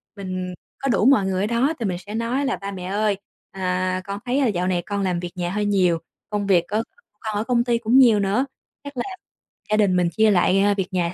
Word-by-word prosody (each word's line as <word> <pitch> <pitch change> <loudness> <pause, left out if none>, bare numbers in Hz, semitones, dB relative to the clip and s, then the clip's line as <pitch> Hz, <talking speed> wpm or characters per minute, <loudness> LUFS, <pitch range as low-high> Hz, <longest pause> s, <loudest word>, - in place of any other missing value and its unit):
mình 185 -2 -4 0.3
có 275 - -1
đủ 220 -1 +2
mọi 260 -8 +5
người 190 0 0
ở - - +1
đó 245 +7 +1
thì 225 - -2
mình 180 -2 -1
sẽ 205 +4 -8
nói 245 +5 -1
là 265 - 0
"Ba 200 0 -6
mẹ 180 -2 -7
ơi, 205 +1 0 0.3
à, 185 0 -1
con 200 0 -5
thấy, 255 +3 +1
ơ, 265 - +3
dạo 180 -3 0
này 180 -2 +1
con 200 -1 -2
làm 180 -2 0
việc 175 0 -5
nhà 175 -1 -2
hơi 210 +1 -1
nhiều, 180 -5 +2 0.3
công 205 -1 -2
việc 175 -3 +4
c - - -23
của 215 +1 +1 0.4
con 215 -2 -4
ở 210 - 0
công 240 -1 +2
ty 240 -1 +1
cũng 235 +2 +2
nhiều 230 -5 +6
nữa, 200 +7 +1 0.4
chắc 285 -2 -9
là - - 0 0.7
gia 215 - +4
đình 200 -4 +3
mình 175 -1 +2
chia 220 +2 +3
lại, 190 +1 +3
à, 205 +1 +4
việc 195 -2 -2
nhà 175 -1 0
200 Hz, 260 wpm, -23 LUFS, 185-225 Hz, 0.7 s, nhiều